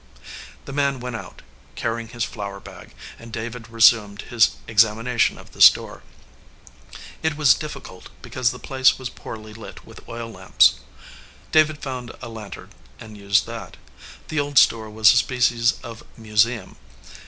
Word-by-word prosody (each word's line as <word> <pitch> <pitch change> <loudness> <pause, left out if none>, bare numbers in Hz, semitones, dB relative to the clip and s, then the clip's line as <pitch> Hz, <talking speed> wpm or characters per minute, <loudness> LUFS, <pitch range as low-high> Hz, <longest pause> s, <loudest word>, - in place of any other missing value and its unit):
The 140 - -8
man 140 -2 0
went 125 -1 -6
out, - - -10 0.3
carrying 115 0 -3
his 120 0 -4
flour 100 -3 -6
bag, - - -14 0.2
and 115 0 -12
David 115 +1 -7
resumed 110 -3 +3
his 115 -2 +2
examination 115 +2 +2
of - - -15
the - - -10
store. - - +6 1.2
It 160 -2 -1
was 145 -7 +6
difficult, 105 -8 -9
because 125 -2 -1
the 125 - -6
place 130 0 +2
was 130 -2 -6
poorly 110 -1 -10
lit 110 +1 -12
with - - -14
oil 115 0 -6
lamps. - - +3 0.7
David 155 -1 +2
found 125 -3 -6
a 120 - -8
lantern, 110 -3 -10 0.3
and 110 -1 -11
used 100 -1 +1
that. - - -9 0.5
The 155 - -1
old 145 -1 -2
store 110 -3 +4
was 110 0 +5
a - - +2
species 120 -2 +2
of 115 -2 -9 0.2
museum. 110 +1 0
115 Hz, 150 wpm, -22 LUFS, 110-125 Hz, 1.2 s, store